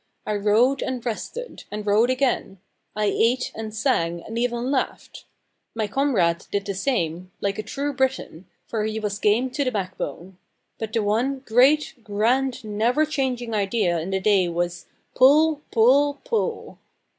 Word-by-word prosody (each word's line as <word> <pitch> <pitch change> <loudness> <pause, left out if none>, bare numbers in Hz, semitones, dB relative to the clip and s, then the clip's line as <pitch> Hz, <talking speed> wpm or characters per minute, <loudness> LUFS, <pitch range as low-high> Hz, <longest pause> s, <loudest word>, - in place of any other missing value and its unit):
I 215 - -1
rowed 215 +7 +3
and 255 -2 -3
rested, 470 - -5
and 210 0 -5
rowed 215 +4 +3
again; 255 -6 0 0.4
I 215 0 0
ate 235 +5 +1
and 220 0 -6
sang, 170 -8 0
and 225 - -8
even 240 +2 -1
laughed. 270 - -3 0.5
My 220 -1 0
comrade 205 -9 +1
did 200 0 -1
the 200 - -2
same, 185 - -2
like 200 +1 -2
a - - +1
true 280 +7 -3
Briton, 260 -10 -2 0.2
for 220 -2 -2
he 220 0 -2
was 205 -1 -3
game 230 +5 +2
to 285 +2 -1
the 260 - +1
backbone. 185 -2 -5 0.4
But 220 -1 -4
the 225 -2 +1
one 245 +6 0
great, 265 +7 +4
grand, 240 +6 0
never 230 +8 +1
changing 255 -6 -2
idea 200 -4 +1
in 165 +4 -5
the 190 0 0
day 190 -3 +3
was 175 +1 -3 0.3
pull 295 +3 +5
pull 275 +6 +4
pull! 470 -1 -2
225 Hz, 155 wpm, -23 LUFS, 200-260 Hz, 0.5 s, pull